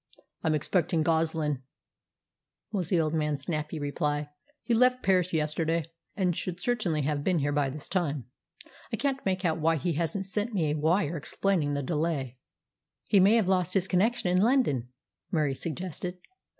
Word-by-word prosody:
"I'm 155 -1 +2
expecting 165 +1 +1
Goslin," 160 -3 0 1.1
was 185 -6 -2
the 180 - +3
old 155 -1 0
man's 150 -3 0
snappy 155 0 -3
reply. 145 0 -2 0.3
"He 240 - 0
left 250 +2 +4
Paris 185 -2 +3
yesterday, 160 +1 0 0.3
and 180 -4 +1
should 180 0 -3
certainly 180 -9 0
have 145 0 -1
been 185 +1 +2
here 145 -1 0
by 145 -1 +1
this 140 +2 -7
time. 150 - -1 0.7
I - - -1
can't 275 -1 -1
make 185 -1 0
out 165 -1 +1
why 165 +1 +3
he 165 +3 -1
hasn't 170 +5 -1
sent 210 +4 -2
me 160 -6 +1
a - - 0
'wire' 165 +2 +1
explaining 150 -1 0
the 140 - -2
delay." 145 -4 -2 0.7
"He 200 - +6
may 200 +4 +6
have 220 -5 +3
lost 185 -1 +1
his 190 -1 +2
connection 195 +1 +2
in 180 +1 +3
London," 210 - +2 0.4
Murie 150 -5 +1
suggested. 180 +4 -5
165 Hz, 165 wpm, -28 LUFS, 150-185 Hz, 1.1 s, He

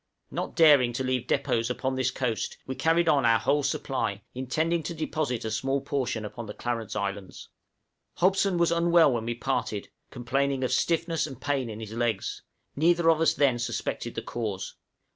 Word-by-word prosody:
Not - - -4
daring 145 -7 +6
to 130 - -2
leave 130 -1 -1
depôts 115 0 0
upon 130 +1 -2
this 130 -1 +1
coast, 125 -4 -2
we 130 - -4
carried 165 +4 +2
on 145 -4 +4
our 115 -1 +5
whole 140 +7 +1
supply, 120 -7 -2
intending 160 +7 0
to 170 +2 -5
deposit 150 -7 -2
a 110 - -2
small 135 +5 0
portion 130 -5 -2
upon 115 +2 -7
the 105 - -7
Clarence 115 -3 -3
Islands. 100 -1 -4 0.7
Hobson 190 0 +2
was 170 -1 +3
unwell 170 -2 +5
when 115 -2 -2
we 120 0 -2
parted, - - -2 0.2
complaining 135 +2 -1
of 130 - 0
stiffness 165 +2 +1
and 135 -5 -9
pain 135 -4 -1
in 110 0 -7
his 110 -1 -7
legs; 115 -3 -1 0.3
neither 165 +2 +4
of 160 0 +1
us 165 - +3
then 135 -4 +2
suspected 120 - -3
the - - -3
cause. 105 -5 -4
130 Hz, 180 wpm, -27 LUFS, 115-160 Hz, 0.7 s, daring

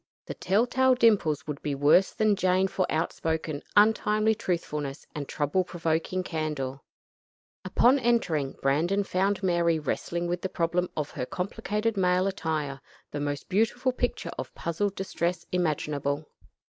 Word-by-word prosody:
The - - -5
tell 205 +5 +2
tale 260 +1 +3
dimples 205 - +3
would 150 -2 -5
be 145 -2 -2
worse 145 +7 +5
than 215 -1 +2
Jane 185 0 +2
for 185 -1 -1
outspoken, 160 -2 -2 0.2
untimely 215 0 +4
truthfulness 150 -8 -3
and 145 -2 -5
trouble 150 +5 0
provoking 170 +1 -1
candor. 150 -6 -3 0.8
Upon 240 +8 +4
entering, 185 - +1
Brandon 165 +9 +2
found 195 +1 0
Mary 170 -2 +2
wrestling 170 +3 -2
with 175 0 -2
the 190 - -2
problem 175 0 0
of 150 -1 -2
her 125 - -4
complicated 210 +4 -2
male 180 0 +3
attire; 155 -7 -2 0.3
the 145 - -4
most 145 0 -3
beautiful 225 +6 +1
picture 245 -1 -2
of - - -6
puzzled 195 +4 -2
distress 175 -2 -2
imaginable. 150 -4 -1
175 Hz, 140 wpm, -27 LUFS, 150-200 Hz, 0.8 s, worse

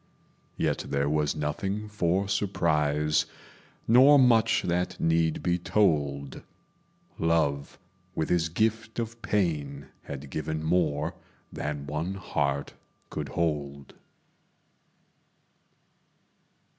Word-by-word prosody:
Yet - - 0
there 70 0 0
was 75 +1 +1
nothing 95 +8 -2
for 95 -2 0
surprise, 75 -6 +1 0.6
Nor 130 +5 +7
much 120 -5 +4
that 90 +1 -1
need 80 -1 +1
be 90 0 +1
told: 70 -9 0 0.8
Love, 80 -4 0 0.4
with 80 - -1
his 85 -2 +2
gift 110 +5 -1
of 115 0 -4
pain, 75 -9 -1 0.2
had 70 0 -7
given 80 0 -3
More 80 -1 +1 0.4
than 75 -1 -4
one 80 +6 -3
heart 70 -7 -2 0.4
could 75 -3 -4
hold. 70 -2 -2
80 Hz, 95 wpm, -27 LUFS, 75-95 Hz, 0.8 s, Nor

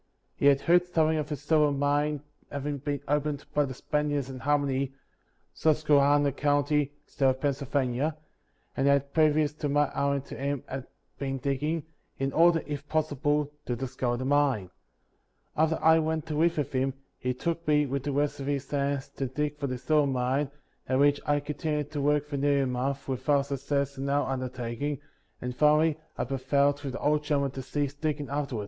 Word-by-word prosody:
He 140 - +2
had 140 -1 +5
heard 175 +3 +4
something 160 -2 +2
of 150 0 -3
a - - 0
silver 150 0 +2
mine 145 +1 0 0.3
having 145 0 -3
been 145 0 -3
opened 150 0 0
by 145 -1 +3
the 130 -2 -6
Spaniards 145 -2 -1
in 130 - -7
Harmony, 140 -1 0 0.6
Susquehanna 145 -2 +3
county, 145 +1 +1
state 135 -2 0
of 130 0 0
Pennsylvania; 140 +1 0 0.6
and 135 0 +1
had, 140 0 +2
previous 155 -1 +3
to 150 -1 -3
my 145 +1 +3
hiring 140 -1 0
to - - -9
him, 140 -1 -2 0.6
been 135 -1 -2
digging, 145 +4 -1 0.3
in 135 0 -1
order, 165 0 +5
if 145 -1 -6
possible, 150 -1 0 0.2
to 120 - 0
discover 125 -1 -2
the 130 - -4
mine. 135 -9 +2 0.8
After 160 +1 +2
I 160 0 +5
went 160 0 -1
to 155 -2 -4
live 165 +2 +2
with 145 -2 -1
him, 135 0 0 0.2
he 125 0 -1
took 170 +4 -3
me, 150 -1 +4
with 140 0 -2
the 145 +2 -3
rest 145 +1 0
of 135 - -5
his 140 -1 -1
hands, 140 -1 0
to 135 - -1
dig 150 +3 -3
for 140 - -1
the 130 -1 -3
silver 145 +4 +2
mine, 130 +3 0 0.4
at 130 - +2
which 145 +1 +4
I 145 0 +3
continued 150 0 -3
to 145 -2 -2
work 145 +1 +2
for 145 -1 -4
nearly 140 0 +2
a - - +1
month, 135 +2 -2
without 135 +2 +1
suc 140 -1 -4
cess 140 0 -1
in 140 +1 -2
our 145 +1 +1
undertaking, 130 +2 -3 0.4
and 125 0 -4
finally 150 +2 +4 0.2
I - - 0
prevailed 140 +2 +1
with 135 -2 -4
the - - -4
old 150 0 +2
gentleman 140 -2 0
to 135 - -6
cease 140 +2 -2
digging 145 -1 -3
after 140 -2 -2
it. - - -2
145 Hz, 190 wpm, -28 LUFS, 135-150 Hz, 0.8 s, had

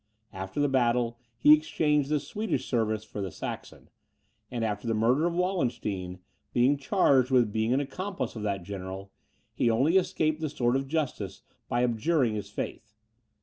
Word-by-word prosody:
After 95 +6 -5
the 145 - +3
battle, 120 -3 +1 0.2
he 150 +6 +7
exchanged 150 -2 +2
the 150 -1 +2
Swedish 205 +10 -3
service 110 -3 0
for 105 -1 -7
the 95 - -3
Saxon; - - -7 0.6
and, 120 -2 -2
after 105 +1 -3
the 115 - +1
murder 125 +9 +3
of 170 - -2
Wallenstein, 120 - -1 0.4
being 125 +4 +4
charged 140 - +3
with 120 -5 +3
being 110 +1 +1
an 130 - +3
accomplice 185 +8 -4
of 110 - -5
that 100 -3 -2
general, 95 +1 -7 0.4
he 120 +1 +2
only 135 +11 +3
escaped 155 -4 0
the 155 - -1
sword 125 -3 +1
of 135 0 -1
justice 135 -11 -3 0.3
by 120 +1 +1
abjuring 125 +1 +1
his 105 -1 -4
faith. 110 +1 -6
120 Hz, 165 wpm, -28 LUFS, 110-150 Hz, 0.6 s, he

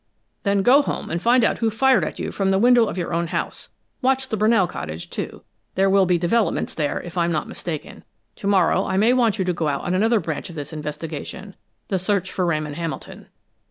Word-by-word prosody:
"Then 200 -1 +1
go 270 +6 +6
home - - -4
and 170 +1 -2
find 240 +2 +4
out - - 0
who 225 - +2
fired 260 +4 +3
at - - -4
you - - -4
from 195 -1 0
the 190 - +3
window 240 +1 +5
of - - -5
your 175 - -3
own 170 0 0
house. - - -4 0.3
Watch 265 0 +1
the - - -1
Brunell 215 -3 +3
cottage, 80 - -7
too - - -5 0.3
there 195 +1 +3
will 195 -1 +4
be 180 -1 +3
developments 190 +6 0
there, 150 -2 -1
if 175 +1 -5
I'm 170 0 +1
not 155 - -1
mistaken. 160 -4 -6 0.3
To - - -4
morrow 190 -1 +3
I 190 - -1
may 220 +5 +4
want 235 -4 +2
you 190 - 0
to 180 - 0
go 165 -2 -2
out 140 -2 -1
on 180 - -2
another 220 +4 +3
branch 160 -3 -4
of 170 - -10
this 145 +1 -6
investigation 155 +5 -6 0.3
the 190 - 0
search 190 0 -1
for 180 -2 -1
Ramon 155 -3 -1
Hamilton." 165 +1 -6
190 Hz, 225 wpm, -22 LUFS, 170-220 Hz, 0.3 s, go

